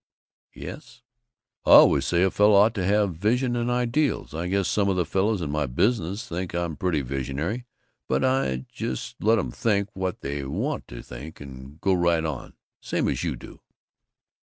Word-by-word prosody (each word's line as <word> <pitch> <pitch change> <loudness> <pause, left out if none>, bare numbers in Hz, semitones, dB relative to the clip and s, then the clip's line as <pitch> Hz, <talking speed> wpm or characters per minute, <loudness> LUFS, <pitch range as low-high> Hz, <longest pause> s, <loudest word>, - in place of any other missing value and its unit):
"Yes 120 - -10 0.3
" - - -67
"I - - +7
always - - +7
say 85 +1 +2
a 95 - +2
fellow 105 +1 +4
ought 105 +3 +5
to 100 -5 -2
have 100 -3 +1
Vision 120 +6 +1
and 120 0 -1
Ideals. 125 - 0
I 85 +2 -3
guess 95 0 0
some 100 -1 +1
of 95 - +1
the 90 -2 +1
fellows 100 +2 0
in 75 -3 -3
my 75 -1 0
business 100 - 0
think 85 0 -4
I'm 85 -2 -2
pretty 85 -4 0
visionary, 70 - -3 0.4
but - - +1
I 65 - 0
just - - -4
let 110 +2 +4
'em 75 - -2
think 100 - 0
what 95 -1 -3
they 70 0 -3
want 65 - -3
to - - -9 0.4
and 70 +2 -11
go 95 - +2
right 85 -2 +2
on 75 -6 -5 0.2
same - - -1
as - - -1
you - - -1
do.... - - -13
90 Hz, 185 wpm, -25 LUFS, 75-105 Hz, 0.4 s, I